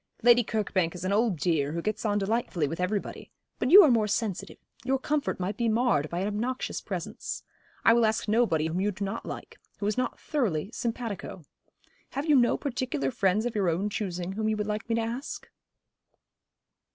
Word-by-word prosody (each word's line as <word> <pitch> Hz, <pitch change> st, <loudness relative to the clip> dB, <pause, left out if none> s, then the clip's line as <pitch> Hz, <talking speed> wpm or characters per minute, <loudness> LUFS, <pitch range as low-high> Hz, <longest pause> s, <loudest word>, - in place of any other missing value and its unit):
'Lady 240 Hz, 0 st, +7 dB
Kirkbank 190 Hz, -6 st, -1 dB
is 180 Hz, +1 st, -6 dB
an 190 Hz, -, +1 dB
old 215 Hz, -3 st, +2 dB
dear, 150 Hz, -2 st, 0 dB
who 170 Hz, -, -2 dB
gets 215 Hz, +1 st, -2 dB
on 205 Hz, -1 st, +2 dB
delightfully 200 Hz, -6 st, 0 dB
with 165 Hz, +4 st, -5 dB
everybody. 195 Hz, +3 st, -3 dB, 0.3 s
But -, -, 0 dB
you 395 Hz, +6 st, +11 dB
are 300 Hz, -, +5 dB
more 220 Hz, -3 st, +3 dB
sensitive. 210 Hz, -2 st, -2 dB, 0.3 s
Your 265 Hz, +1 st, +1 dB
comfort 290 Hz, -2 st, -1 dB
might 190 Hz, +3 st, -2 dB
be 235 Hz, -1 st, +1 dB
marred 220 Hz, -, +2 dB
by 175 Hz, +1 st, -2 dB
an 195 Hz, -, 0 dB
obnoxious 235 Hz, +5 st, -2 dB
presence. -, -, -5 dB, 0.4 s
I 225 Hz, -, +8 dB
will 235 Hz, 0 st, +4 dB
ask 220 Hz, 0 st, -1 dB
nobody 210 Hz, -8 st, +2 dB
whom 165 Hz, +3 st, -1 dB
you 205 Hz, -, +2 dB
do 200 Hz, 0 st, -3 dB
not 195 Hz, +4 st, -5 dB
like -, -, -8 dB, 0.2 s
who 200 Hz, -, -4 dB
is 210 Hz, +3 st, 0 dB
not 255 Hz, -, -2 dB
thoroughly 210 Hz, -, -1 dB
simpatico. 230 Hz, -7 st, -4 dB, 0.7 s
Have 280 Hz, +2 st, -2 dB
you 300 Hz, -2 st, +4 dB
no 240 Hz, -3 st, +4 dB
particular 250 Hz, -, -2 dB
friends 195 Hz, -, +1 dB
of 245 Hz, -, -1 dB
your 195 Hz, -4 st, +2 dB
own 190 Hz, +6 st, -1 dB
choosing 180 Hz, -3 st, -3 dB
whom 215 Hz, +2 st, -1 dB
you 215 Hz, -, 0 dB
would 210 Hz, -, -1 dB
like 215 Hz, +2 st, -4 dB
me 230 Hz, -, +2 dB
to 230 Hz, -, +1 dB
ask?' 235 Hz, +5 st, -5 dB
210 Hz, 200 wpm, -28 LUFS, 185-235 Hz, 0.7 s, you